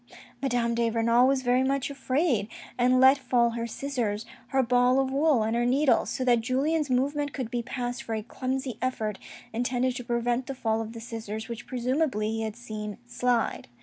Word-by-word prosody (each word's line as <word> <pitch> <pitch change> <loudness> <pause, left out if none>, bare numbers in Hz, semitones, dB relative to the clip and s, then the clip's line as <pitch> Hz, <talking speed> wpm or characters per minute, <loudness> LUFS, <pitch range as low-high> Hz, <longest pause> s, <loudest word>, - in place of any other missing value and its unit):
Madame 240 -3 +1
de 235 0 +1
Renal 230 +2 +4
was 270 -1 +1
very 250 +1 +3
much 275 +1 0
afraid, 265 - 0 0.3
and 250 +1 +3
let 265 +2 +7
fall 245 -2 +2
her 230 0 -3
scissors, 235 -5 -2 0.2
her 265 0 +2
ball 250 +1 +3
of 265 -1 0
wool 280 -4 +3
and 220 +1 0
her 240 - +1
needles, 265 +3 +3
so 255 - -2
that 240 -2 +4
Julien's 280 +5 0
movement 285 +3 0
could 250 -4 -4
be 240 - -1
passed 245 0 -4
for 225 - -4
a 215 - -3
clumsy 255 0 -3
effort, 220 -5 -2 0.3
intended 245 +2 0
to 245 - -5
prevent 240 +1 -1
the 275 - -4
fall 225 -3 0
of 225 0 -6
the 230 - -7
scissors, 225 -2 -6
which 235 0 -7
presumably 255 -3 0
he 225 0 -2
had 220 -1 -3
seen 215 -3 -6
slide. 240 -1 0
245 Hz, 190 wpm, -27 LUFS, 230-265 Hz, 0.3 s, let